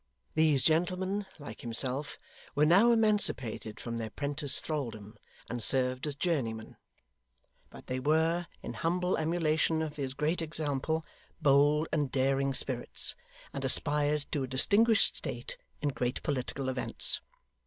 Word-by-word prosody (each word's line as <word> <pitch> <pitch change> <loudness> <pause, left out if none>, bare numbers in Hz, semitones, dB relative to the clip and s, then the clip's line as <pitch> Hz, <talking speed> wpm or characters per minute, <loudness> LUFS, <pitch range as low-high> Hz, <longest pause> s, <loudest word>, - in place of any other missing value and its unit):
These 155 -4 +3
gentlemen, 185 +5 +1
like 145 -3 -9
himself, 130 +4 -1 0.4
were 150 +1 +4
now 195 +9 +6
emancipated 205 - +1
from 115 -1 -4
their 110 -1 -4
'prentice 145 +2 0
thraldom, 115 -9 -5 0.3
and 120 0 -4
served 130 +3 +2
as 145 - -3
journeymen; 130 -9 -2 0.9
but - - -13
they 130 0 -3
were, 160 +4 +1 0.2
in - - -5
humble 180 +2 0
emulation 160 -1 +1
of 150 -1 -6
his 135 -2 -3
great 155 +4 0
example, 155 0 -2 0.3
bold 145 +2 +4
and 145 -4 0
daring 135 0 +1
spirits, - - -1 0.4
and - - -4
aspired 150 0 +2
to 145 - -1
a 130 - -2
distinguished 205 - +4
state - - -5 0.2
in 145 - +2
great 125 -2 -2
political 135 -1 -2
events. 130 -1 0
145 Hz, 130 wpm, -31 LUFS, 130-165 Hz, 0.9 s, now